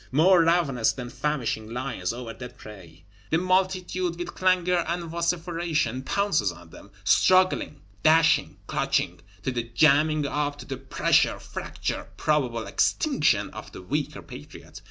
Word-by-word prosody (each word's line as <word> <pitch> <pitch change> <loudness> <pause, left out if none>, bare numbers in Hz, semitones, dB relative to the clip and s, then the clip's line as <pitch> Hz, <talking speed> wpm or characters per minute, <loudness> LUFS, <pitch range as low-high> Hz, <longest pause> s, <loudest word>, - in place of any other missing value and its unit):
More 170 +6 +5
ravenous 160 -9 +2
than 125 -2 -7
famishing 125 -8 -2
lions 120 -7 -3
over 120 -1 -7
dead 125 +1 -10
prey, 90 -6 -13 0.3
the 160 - +2
multitude, 185 -1 0
with 175 - -5
clangor 180 -1 +2
and 170 +1 -2
vociferation, 165 -5 -1
pounces 150 - 0
on 85 -1 -14
them; - - -14
struggling, 185 -6 +3 0.2
dashing, 160 +1 +4
clutching, - - -1 0.2
to 130 - -1
the 120 -1 -1
jamming 150 +6 +3
up, 145 0 -2
to - - -10
the 135 - -5
pressure, 135 0 +1
fracture, - - -5
and - - -25
probable 125 -7 0
extinction - - +1
of - - -10
the 95 - -9
weaker 145 +9 -3
Patriot. - - -11
150 Hz, 140 wpm, -26 LUFS, 120-170 Hz, 0.3 s, More